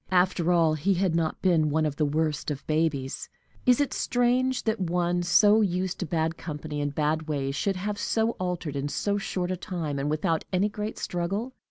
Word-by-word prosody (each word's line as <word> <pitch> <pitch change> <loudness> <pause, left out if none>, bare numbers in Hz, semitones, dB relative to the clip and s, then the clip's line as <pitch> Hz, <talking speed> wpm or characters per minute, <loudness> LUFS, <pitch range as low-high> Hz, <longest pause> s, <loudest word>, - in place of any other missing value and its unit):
After 180 -1 +2
all, 165 -3 +4
he 185 +6 +1
had 180 -2 +1
not 165 -2 -1
been 165 -5 +3
one 155 +1 +1
of 150 -2 -1
the 155 - +2
worst 155 +1 -1
of 145 -2 -5
babies. 155 -4 -1 0.4
Is 250 -1 +5
it 285 - +1
strange 250 +1 +1
that 220 -1 0
one 175 -1 0
so 205 +5 +5
used 185 -2 -1
to 180 - -3
bad 160 +1 -1
company 150 -2 -5
and 145 0 -2
bad 155 +1 0
ways 140 -3 -1
should 195 +5 0
have 205 +3 -3
so 225 0 +1
altered, 180 -5 -3
in 140 +1 -1
so 205 +7 -1
short 185 -2 -2
a - - 0
time, 165 -6 -3
and 140 +2 -1
without 155 +1 0
any 190 +3 +2
great 210 +1 -5
struggle? 195 +8 -2
175 Hz, 200 wpm, -27 LUFS, 155-195 Hz, 0.4 s, Is